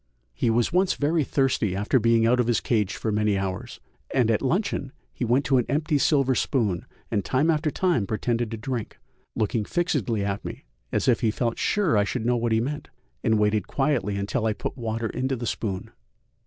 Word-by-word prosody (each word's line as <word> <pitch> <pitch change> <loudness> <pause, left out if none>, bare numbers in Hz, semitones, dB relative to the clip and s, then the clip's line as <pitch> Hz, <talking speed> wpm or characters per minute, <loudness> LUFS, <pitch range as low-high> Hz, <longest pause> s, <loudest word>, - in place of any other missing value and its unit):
He 120 - 0
was 120 +7 +1
once 185 +1 +3
very 155 +2 +1
thirsty 130 -8 +1
after 105 +7 +2
being 115 0 +3
out 125 +2 +3
of 120 - +2
his 120 - +2
cage 105 -5 0
for 110 - -2
many 105 -1 +1
hours, 95 -1 -4 0.3
and 125 -4 +3
at 110 - +1
luncheon 140 -2 -1 0.2
he - - -4
went 125 +4 +2
to 135 -2 +3
an 120 - 0
empty 150 0 +1
silver 135 -3 +3
spoon 110 - 0 0.2
and 105 -4 +1
time 145 - +2
after 155 0 +1
time 150 - +1
pretended 115 +1 -1
to 115 - -5
drink, 120 0 -4 0.4
looking 110 +1 0
fixedly 120 - 0
at 100 0 -2
me - - -7 0.3
as - - 0
if - - +4
he 115 - +3
felt 115 +1 -1
sure 185 - +2
I - - +4
should 110 +3 -3
know 125 +1 +3
what 120 -1 0
he 110 - +3
meant, 145 +5 -3 0.3
and 110 -2 +3
waited 105 0 +1
quietly 135 -8 0
until 105 +3 -1
I 110 - +1
put - - -5
water 115 -2 -3
into 130 +2 -1
the 120 -1 -5
spoon. 105 -1 -3
115 Hz, 205 wpm, -25 LUFS, 110-135 Hz, 0.4 s, if